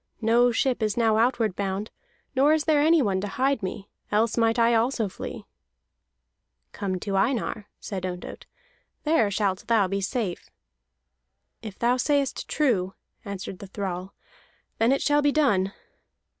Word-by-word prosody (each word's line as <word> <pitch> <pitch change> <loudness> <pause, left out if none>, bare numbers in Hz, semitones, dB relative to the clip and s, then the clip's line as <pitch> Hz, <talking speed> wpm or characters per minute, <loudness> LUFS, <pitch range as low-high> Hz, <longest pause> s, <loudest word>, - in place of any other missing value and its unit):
No 235 +2 +4
ship 250 +1 0
is 215 0 0
now 225 -2 +3
outward 230 -4 +1
bound, 200 +1 -3 0.4
nor 280 +4 +5
is 315 -1 +1
there 305 -2 +3
anyone 285 - +3
to 205 - -3
hide 265 +4 0
me. 195 +1 -5 0.2
Else 215 +1 +2
might 230 0 +2
I 235 0 +4
also 230 -1 +1
flee." 185 - -7 1.3
"Come 190 -2 -3
to 200 -2 -2
Einar," 215 0 0
said 190 -3 -5
Ondott. 180 -1 -6 0.6
"There 300 -9 +3
shalt 200 -1 -1
thou 220 -4 +3
be 195 +1 -2
safe." 200 -3 -3 1.1
"If 215 -3 -8
thou 240 +2 +2
sayest 280 0 0
true," 200 -11 0 0.3
answered 195 -2 -6
the 200 - -9
thrall, 190 -1 -5 0.6
"then 230 +3 +4
it 275 - +1
shall 295 0 +3
be 290 0 +3
done." 205 -11 +2
225 Hz, 145 wpm, -25 LUFS, 195-255 Hz, 1.3 s, nor